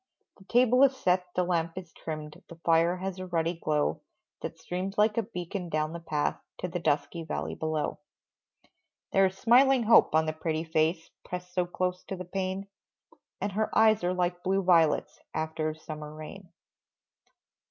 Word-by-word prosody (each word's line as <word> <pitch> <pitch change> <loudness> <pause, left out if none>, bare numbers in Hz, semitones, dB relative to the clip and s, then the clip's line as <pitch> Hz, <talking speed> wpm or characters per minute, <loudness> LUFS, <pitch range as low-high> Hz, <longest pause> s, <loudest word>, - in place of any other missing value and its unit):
The 190 - -17
table 250 +3 +4
is 270 -1 +4
set, 180 -4 +1
the 180 - +2
lamp 170 -1 -1
is 175 -3 -8
trimmed, 155 -1 -7
The 170 - -9
fire 170 +2 +4
has 190 0 -4
a 185 - -5
ruddy 170 -1 0
glow 155 -3 0 0.4
That - - -5
streams 185 +3 -4
like 210 0 +4
a - - +3
beacon 180 -2 -5
down 155 0 -1
the 170 - -5
path, 155 -3 -1 0.2
To - - -3
the 175 0 -3
dusky 150 +1 0
valley 160 - -3
below. 155 -2 -2 1.1
There 195 0 +5
is 190 0 -7
smiling 255 +3 +5
hope 220 -7 +6
on 160 0 +4
the 155 - -1
pretty 160 0 -2
face 160 +1 0
Pressed 180 0 -7
so 180 -1 +1
close 180 0 -2
to 195 - -4
the 185 0 -7
pane, 190 +2 -3 0.7
And 205 - -2
her 215 +3 0
eyes 220 -3 +5
are 175 - +2
like 180 0 -1
blue 195 +2 +1
violets 165 -4 +3 0.2
After 155 0 -1
a 155 - -5
summer 155 -1 -8
rain. 155 +5 -10
180 Hz, 175 wpm, -29 LUFS, 160-190 Hz, 1.1 s, hope